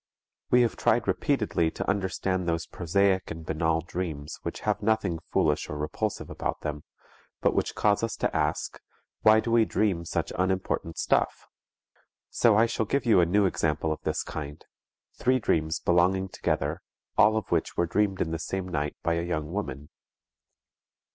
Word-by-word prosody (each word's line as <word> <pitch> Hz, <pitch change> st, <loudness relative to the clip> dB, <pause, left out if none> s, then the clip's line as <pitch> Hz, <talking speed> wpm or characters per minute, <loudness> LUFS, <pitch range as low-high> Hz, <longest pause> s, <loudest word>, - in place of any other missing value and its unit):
We 125 Hz, 0 st, +5 dB
have 115 Hz, -, 0 dB
tried -, -, +2 dB
repeatedly 80 Hz, -1 st, +1 dB
to -, -, -5 dB
understand 95 Hz, -1 st, -1 dB
those 85 Hz, -1 st, -1 dB
prosaic 95 Hz, +2 st, +1 dB
and 80 Hz, -1 st, -7 dB
banal 80 Hz, +1 st, 0 dB
dreams 80 Hz, -4 st, -5 dB
which -, -, -5 dB
have -, -, 0 dB
nothing 105 Hz, -6 st, +1 dB
foolish 75 Hz, -1 st, +1 dB
or 75 Hz, -, -4 dB
repulsive 75 Hz, +1 st, -3 dB
about -, -, -4 dB
them, 75 Hz, -1 st, -4 dB, 0.6 s
but -, -, +2 dB
which -, -, -1 dB
cause 105 Hz, -1 st, +2 dB
us 115 Hz, -1 st, -2 dB
to -, -, -2 dB
ask: -, -, -1 dB, 0.4 s
"Why 110 Hz, 0 st, +6 dB
do 115 Hz, -, -2 dB
we 115 Hz, -1 st, +5 dB
dream 100 Hz, -6 st, 0 dB
such 85 Hz, 0 st, -2 dB
unimportant 90 Hz, -3 st, -1 dB
stuff?" -, -, +1 dB, 0.9 s
So 115 Hz, -3 st, +4 dB
I 110 Hz, -, +6 dB
shall 115 Hz, -1 st, -2 dB
give 140 Hz, +4 st, 0 dB
you 110 Hz, -5 st, +5 dB
a 85 Hz, -, +3 dB
new 100 Hz, +3 st, +3 dB
example 80 Hz, -3 st, 0 dB
of 80 Hz, -, -4 dB
this -, -, -1 dB
kind, 75 Hz, 0 st, -7 dB, 0.5 s
three 130 Hz, +1 st, +2 dB
dreams 80 Hz, -8 st, 0 dB
belonging 95 Hz, +2 st, +2 dB
together, -, -, -2 dB, 0.3 s
all 110 Hz, +1 st, +5 dB
of 110 Hz, -, -4 dB
which 85 Hz, -2 st, 0 dB
were 85 Hz, -, +3 dB
dreamed 95 Hz, +2 st, 0 dB
in 80 Hz, -, -1 dB
the 80 Hz, -, -2 dB
same 95 Hz, +2 st, -3 dB
night 75 Hz, -4 st, -2 dB
by 85 Hz, -, +1 dB
a 85 Hz, -, 0 dB
young 80 Hz, -3 st, -3 dB
woman. 75 Hz, -8 st, -4 dB
90 Hz, 170 wpm, -27 LUFS, 80-105 Hz, 0.9 s, Why